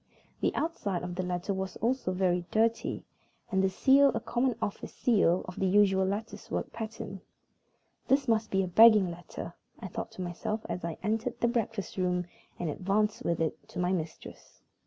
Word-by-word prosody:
The - - 0
outside 205 - -2
of 180 0 -4
the 185 - -2
letter 180 +2 -2
was 190 0 -4
also 240 -3 0
very 180 -1 +1
dirty, 225 +1 +1 0.5
and 190 -1 +2
the 190 - +3
seal 275 +8 +5
a - - +1
common 245 0 0
office 205 - -4
seal 195 -7 +2
of 180 - -7
the 190 - +2
usual 190 -1 +4
lattice 210 +3 -4
work - - -3
pattern. 220 -4 -6 0.9
"This 270 0 +3
must 220 -1 +2
be 195 0 +2
a - - -2
begging 210 -1 +7
letter," 170 +1 -8 0.3
I - - -6
thought - - -5
to 185 - -5
myself 180 +5 -4
as 180 - -4
I 170 -1 -3
entered 225 +3 -1
the 235 - +3
breakfast 225 -5 -2
room 180 -1 0 0.3
and 175 - -3
advanced 200 +7 0
with 170 - 0
it 160 -1 -2
to - - -10
my 180 0 +1
mistress. 165 -4 -6
195 Hz, 180 wpm, -30 LUFS, 180-225 Hz, 0.9 s, begging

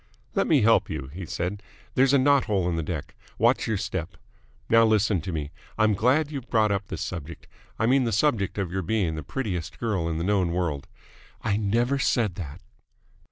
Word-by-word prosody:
"Let - - +1
me 145 -8 +4
help 115 +1 +4
you," 65 - -5
he 90 -1 -7
said. 95 +6 -3 0.3
"There's 135 +1 +4
a 140 - +5
knothole 130 -9 +3
in 85 - 0
the 80 - -1
deck. 80 -2 -5 0.2
Watch - - +3
your 110 - 0
step. 90 -4 -4 0.5
Now, 115 0 +6
listen 110 -4 +3
to 90 - -5
me. 75 -3 -4 0.3
I'm 110 0 +4
glad 135 +9 +2
you've 135 -5 -6
brought 110 -2 +3
up 100 0 -1
this - - -5
subject 80 +4 -6 0.3
I 110 - +1
mean 130 +2 +3
the 115 - 0
subject 110 -4 +1
of 95 -4 -2
your 95 +1 -1
being 95 -3 0
the 80 - -4
prettiest 90 - -4
girl 100 -8 -1
in 80 - -2
the 85 - -2
known 95 -3 +1
world 85 -6 -2 0.3
" - - -26
"I 110 -3 +1
never 120 +6 +1
said 115 -6 +1
that." 80 -6 -8
100 Hz, 205 wpm, -26 LUFS, 85-115 Hz, 0.5 s, Now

